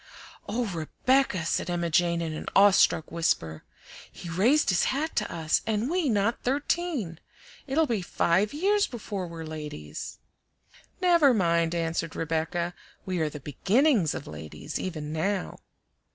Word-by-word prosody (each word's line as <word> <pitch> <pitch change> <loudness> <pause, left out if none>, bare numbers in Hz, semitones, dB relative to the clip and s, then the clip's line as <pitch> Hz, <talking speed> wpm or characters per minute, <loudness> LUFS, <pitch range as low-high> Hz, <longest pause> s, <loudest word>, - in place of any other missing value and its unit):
"Oh, 240 +3 0
Rebecca!" 190 - 0
said 170 - -1
Emma 170 -1 -1
Jane 170 0 +2
in 160 -1 -3
an 155 - -7
awe 200 +1 +8
struck 160 -4 +3
whisper. 80 - -1 0.5
"He 175 - -9
raised 235 - +3
his 180 -2 +3
hat 305 +5 -1
to 210 - 0
us, 160 -2 0
and 220 +5 0
we 350 -5 +1
not 215 +1 +1
thirteen! 275 - -1 0.5
It'll 305 +4 +2
be 230 -8 -1
five 185 +3 +1
years 400 +7 +2
before 205 -6 -5
we're 165 -1 -7
ladies." 150 - -7 0.8
"Never 340 -8 +5
mind," 170 -3 +2
answered 165 0 -2
Rebecca; 165 +2 -1 0.3
"we 185 -2 -2
are 155 -1 +1
the 150 -1 -9
BEGINNINGS 200 - +2
of - - -6
ladies, 75 0 -7
even 155 -5 -4
now." 190 +4 -2
180 Hz, 145 wpm, -27 LUFS, 165-245 Hz, 0.8 s, awe